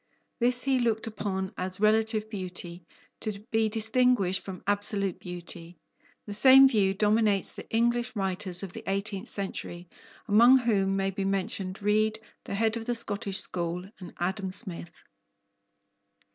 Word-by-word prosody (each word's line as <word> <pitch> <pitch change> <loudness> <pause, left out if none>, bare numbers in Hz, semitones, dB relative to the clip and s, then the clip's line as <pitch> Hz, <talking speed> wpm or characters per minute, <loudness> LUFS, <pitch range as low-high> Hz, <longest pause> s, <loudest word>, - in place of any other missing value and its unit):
This 245 +1 +1
he 265 -1 +2
looked 225 -2 0
upon 200 -3 -4
as 185 +1 -2
relative 215 0 +2
beauty, 180 -4 -7 0.3
to 215 -2 -3
be 220 -1 +2
distinguished 225 -3 +2
from 190 -2 -9
absolute 200 -2 -1
beauty. 175 -1 -9 0.5
The 205 - -6
same 265 +5 +8
view 200 -6 +1
dominates 210 -1 +1
the - - -10
English 235 +2 0
writers 190 -2 -3
of 185 -2 -7
the - - -7
eighteenth 195 0 -3
century, 180 -3 -6 0.4
among 235 +5 +7
whom 200 -6 +1
may 195 0 0
be 195 +1 -4
mentioned 195 0 -3
Reid, 215 +1 +1 0.3
the - - -4
head 220 +2 +1
of 225 +1 -7
the 240 - 0
Scottish 205 -4 0
school, 180 +2 -4
and 180 -3 -9
Adam 190 +2 -2
Smith. 175 -4 -2
200 Hz, 145 wpm, -28 LUFS, 190-225 Hz, 0.5 s, same